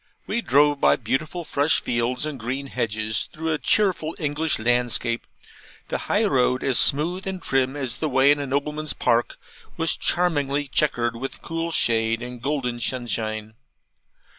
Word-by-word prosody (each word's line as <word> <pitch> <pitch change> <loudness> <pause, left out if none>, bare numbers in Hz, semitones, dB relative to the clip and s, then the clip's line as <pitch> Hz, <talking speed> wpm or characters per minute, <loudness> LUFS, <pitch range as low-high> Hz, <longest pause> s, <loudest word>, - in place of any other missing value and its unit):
We 235 - -1
drove 145 - +3
by - - +5
beautiful 155 +8 -2
fresh 145 +2 +2
fields 120 +3 -1
and 150 -4 -5
green 130 +5 -3
hedges, 110 -5 -2
through 160 +1 -2
a 150 - -2
cheerful 185 -6 +1
English 150 +1 0
landscape; 120 0 0 0.6
the - - -1
high 215 +2 +3
road, 130 -7 +2
as 135 -2 +3
smooth 175 +7 +1
and 190 -1 -3
trim 135 -4 0
as 130 -5 -2
the 155 - -1
way 135 +1 +5
in 145 - +2
a 140 - -3
nobleman's 150 +1 -1
park, 120 0 +1 0.4
was 165 0 +1
charmingly 145 -5 0
chequered 120 -5 0
with 135 +3 -6
cool 165 0 -3
shade 115 -4 +1
and 125 -1 -8
golden 125 -4 -2
sunshine. 110 -3 -3
135 Hz, 155 wpm, -24 LUFS, 120-155 Hz, 0.6 s, by